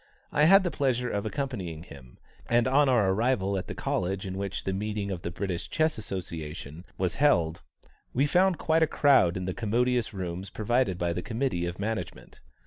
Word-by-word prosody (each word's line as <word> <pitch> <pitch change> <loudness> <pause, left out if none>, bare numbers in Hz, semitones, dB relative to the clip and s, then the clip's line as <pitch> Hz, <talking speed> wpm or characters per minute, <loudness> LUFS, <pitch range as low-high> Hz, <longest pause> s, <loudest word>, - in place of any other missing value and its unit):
I 150 - +4
had 195 +4 +7
the 175 - -1
pleasure 125 -4 0
of 100 +1 -2
accompanying 105 - -4
him, 65 -7 -14 0.3
and 120 +1 +3
on 140 +1 +4
our 110 -7 +3
arrival 100 -2 +1
at 95 - -3
the - - -6
College 95 +2 -2
in 95 -1 -4
which 95 0 -4
the 95 - -2
meeting 105 0 -3
of 90 -3 -4
the 85 - -4
British 90 0 -4
Chess 155 -5 +1
Association 85 -5 -6
was 90 -2 -1
held, 85 - +3 0.5
we 135 +4 +2
found 180 +3 +3
quite 160 0 +2
a 160 - +5
crowd 130 - +4
in 95 - -4
the 95 - -2
commodious 120 +3 0
rooms 95 -1 -5
provided 110 -2 0
by 85 -1 -1
the 90 - -3
Committee 115 -6 -1
of 85 0 -5
Management. 105 -3 -5
100 Hz, 190 wpm, -28 LUFS, 90-130 Hz, 0.5 s, had